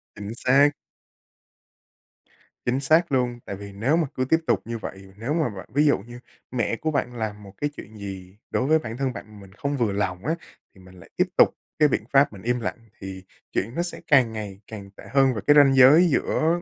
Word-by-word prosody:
Chính 100 -1 -7
xác. 135 +4 +4 1.9
Chính 125 +2 +1
xác 160 +4 +3
luôn. 125 -2 0
Tại 100 - -5
vì 100 +1 -9
nếu 115 +10 +1
mà 165 -3 +1
cứ 130 - 0
tiếp 160 +5 +3
tục - - +3
như 115 0 -4
vậy, 95 -3 -9
nếu 115 +7 -2
mà 160 -5 +1
bạn 95 -4 -9
ví 145 +3 +3
dụ 145 - +4
như 120 +4 -11 0.3
mẹ 120 -3 0
của 155 +7 -2
bạn 125 -4 -2
làm 105 -2 -4
một 100 -1 -12
cái 145 - +1
chuyện 110 +1 -11
gì 95 -2 -8
đối 130 - 0
với 160 +1 +4
bản 115 -5 -7
thân 135 -1 -1
bạn, 105 -1 -10
mình 95 -1 -14
không 140 +7 -3
vừa 115 -5 +1
lòng 95 -1 -2
á, 160 - +1 0.4
thì 95 - -17
mình 90 0 -16
lại - - -15
tiếp - - +3
tục - - +7 0.3
cái 150 - +6
biện 130 - -1
pháp 140 -3 +5
mình 100 - -11
im 120 +3 0
lặng, 115 - -3 0.2
thì 95 -1 -8 0.3
chuyện 115 +6 -2
nó 170 - 0
sẽ 175 - -6
càng 130 -6 +4
ngày 105 -3 -6
càng 100 -3 -9
tệ - - -12
hơn. 135 -1 +4
Và 105 - -4
cái 145 - +7
ranh 140 -2 +7
giới 140 +7 +7
giữa, 165 +3 +1
120 Hz, 230 wpm, -24 LUFS, 100-140 Hz, 1.9 s, tục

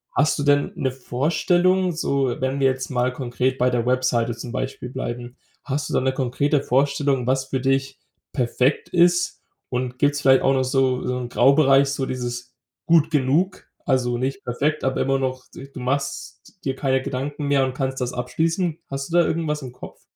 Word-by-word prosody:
Hast 155 +3 +2
du 145 - 0
denn 145 0 +2
'ne 130 -2 -1
Vorstellung, 175 +8 +1
so 135 -5 0
wenn 130 +1 -1
wir 135 - +4
jetzt 130 0 -2
mal 125 0 0
konkret 130 0 -1
bei 125 0 +3
der 120 -1 0
Webseite 125 -2 +1
zum 120 +1 -7
Beispiel 130 0 -4
bleiben, 120 -1 -6 0.3
hast 145 +1 -3
du - - -4
da - - +2
'ne 130 0 +1
konkrete 135 +3 0
Vorstellung, 140 0 +1
was 130 +1 +1
für 130 -1 -3
dich 135 0 0 0.4
perfekt 125 +1 0
ist? 175 0 +2 0.3
Und 125 0 -3
gibt's 145 0 +2
vielleicht 130 -1 +5
auch 135 - +4
noch 130 -1 +2
so 130 -1 +1
so 125 0 -1
'n 120 -1 -5
Graubereich, 135 +1 +5
so 135 -1 -2
dieses 125 -1 -5 0.3
„gut 165 -2 +4
genug“, 150 +7 +1 0.2
also 125 -3 +1
nicht 135 +10 -3
perfekt, 150 +5 -1
aber 130 0 0
immer 135 0 +1
noch 130 -1 -3
di 135 +1 -10
du 135 - -9
machst 140 +3 -3 0.3
dir 135 -1 -1
keine 130 -1 +1
Gedanken 140 +3 -4
mehr 140 -1 +3
und 130 - -3
kannst 130 0 -3
das 125 0 -2
abschließen? 160 +7 -1
Hast 135 +2 -5
du 175 - +4
da 170 - +5
irgendwas 155 -2 -1
im 130 - -7
Kopf? 125 - -12
135 Hz, 190 wpm, -23 LUFS, 125-145 Hz, 0.4 s, vielleicht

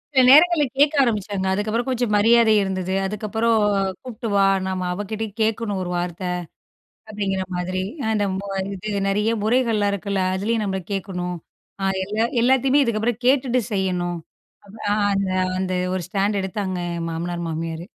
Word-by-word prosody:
சில 260 - +7
நேரங்களிள்ல, 310 +2 +7
கேட்க 290 +2 +4
ஆரம்பிச்ட்டாங்க. 205 -5 -1
அதுக்கப்புறோம் 215 +5 -1
கொஞ்சம் 245 -3 0
மரியாதை 225 +1 +5
இருந்தது. 190 -1 -2
அதுக்கப்புறோம் 215 +2 0 0.4
கூப்ட்டு 245 -2 -6
வா, 200 0 +5 0.2
நாம 185 -1 -2
அவகிட்டயும் 205 +2 -5
கேட்கணும் 220 -2 0
ஒரு 180 - -4
வார்த்த. 175 +1 -3 0.8
அப்படிங்கிற 200 -3 -2
மாதிரி. 185 +1 -2 0.2
அ - - -2
அந்த, 210 -2 +1 0.5
இது 200 +2 -3
நெறைய 210 +3 +1
முறைகள்லாம் 220 -3 +2
இருக்குல்ல. 200 0 -2
அதுலயும் 215 +4 0
நம்ம 190 -1 -1
கேட்கணும். 180 -2 -3 0.4
ஆ, - - 0 0.2
எல்லா 210 +4 0 0.2
எல்லாத்தையுமே 265 +3 +4
இதுக்கப்புறம் 230 -1 -1
கேட்டுட்டு 255 -1 +3
செய்யணும். 180 -3 -1 0.7
ஆ, - - +2 0.2
அந்த, 195 -1 0 0.3
அந்த 185 0 -2 0.2
ஒரு 185 - -1
ஸ்டாண்ட் 200 +2 0
எடுத்தாங்க 190 -1 -3 0.2
என் 165 0 -3
மாமனார் 170 +1 -3
மாமியாரு. 165 +1 -4
205 Hz, 140 wpm, -22 LUFS, 185-230 Hz, 0.8 s, சில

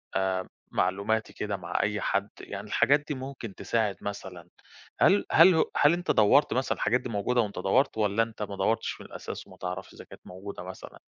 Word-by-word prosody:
آآ 95 -1 0 0.2
معلوماتي 100 +4 0
كده 105 -1 -3
مع 85 -2 -2
أي 105 0 -1
حد، 100 +1 0
يعني 100 +1 -7
الحاجات 140 +7 +4
دي 150 - -2
ممكن 130 -5 -7
تساعد 110 -4 -1
مثلًا 95 -4 -7 0.5
هل 200 +1 +5
هل 175 +2 +7
هو 160 - +2
هل 145 +3 +5
أنت 175 +1 0
دوّرت 120 +7 +4
مثلًا؟ 130 +2 0
الحاجات 125 +2 +1
دي 125 - -6
موجودة 115 +2 +1
أنت 100 - -7
دوّرت، 125 +6 +2
والّا 105 +1 +2
أنت 115 -1 -9
ما 100 -1 -5
دوّرتش 110 +4 -1
من - - -10
الأساس - - -7
وما - - -15
تعرفش 90 +1 -6
إذا - - -11
كانت - - -14
موجودة 95 +2 -8
مثلًا؟ - - -10
105 Hz, 195 wpm, -28 LUFS, 100-125 Hz, 0.5 s, هل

